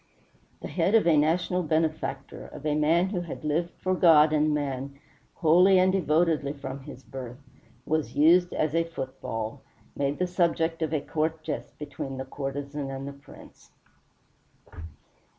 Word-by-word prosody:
The - - -3
head 205 - +1
of 220 - +4
a 170 -2 +5
national 170 +4 +2
benefactor, 160 -1 -2
of 150 - -11
a 150 - +1
man 165 +5 +2
who 185 -3 -2
had 170 -2 -7
lived 165 +3 -1
for 185 - +1
God 160 -4 +6
and 155 0 +2
man 140 -2 -3 0.4
wholly 180 +4 +5
and 185 0 +4
devotedly 160 -5 +1
from 135 -1 -7
his 135 -1 -11
birth, 125 -2 -8 0.5
was 155 -2 -1
used 175 +5 +5
as 155 -1 -1
a 165 0 +2
football, 130 -8 -6 0.3
made 140 +1 -1
the 180 - +1
subject 170 -2 0
of 160 -2 -1
a 155 -3 0
court 160 +1 -2
jest - - -5
between 135 -2 -6
the 130 - -5
courtesan 140 +1 -5
and 135 0 -6
the 140 - -6
prince. 140 0 -16
155 Hz, 155 wpm, -27 LUFS, 140-170 Hz, 0.5 s, God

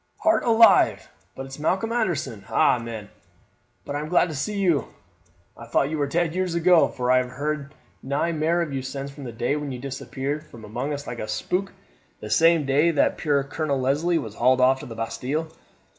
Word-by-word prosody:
"Heart 325 +1 +3
alive, 230 -1 +5 0.2
but 135 - -6
it's 135 +2 -10
Malcolm 190 +8 0
Anderson! 155 - -2
Eh, 110 - +4
man, 115 -3 -7 0.8
but 145 - -5
I - - -1
am 150 +1 -5
glad 180 0 +3
to 155 - -5
see 200 +10 -3
you! 170 - +1 0.7
I - - -11
thought 140 - +1
you 155 - -2
were 145 - +1
dead 165 +2 0
years 185 -1 -1
ago, 170 0 +5
for 125 0 -1
I 130 - +5
have 125 0 0
heard 140 +2 -4 0.3
nae 140 +5 -1
mair 165 +2 +1
of 150 -4 -6
you 135 - -2
since 135 +1 -6
the 135 -4 -8
day 120 +5 -1
when 150 -2 -4
you 125 - -5
disappeared 135 +2 -4
from 115 -8 -13
among 125 +7 -4
us 145 -1 -4
like 120 -2 -6
a 110 - -4
spook, 180 - -2 0.5
the 105 - -8
same 165 -2 +4
day 145 +5 +3
that 165 - +1
puir 145 -3 +1
Colonel 145 0 -2
Leslie 150 +7 +1
was 110 -9 -5
hauled 130 +3 +3
off 130 +1 +4
to - - -9
the 115 - -8
Bastille. 135 +8 -3
140 Hz, 205 wpm, -24 LUFS, 130-165 Hz, 0.8 s, alive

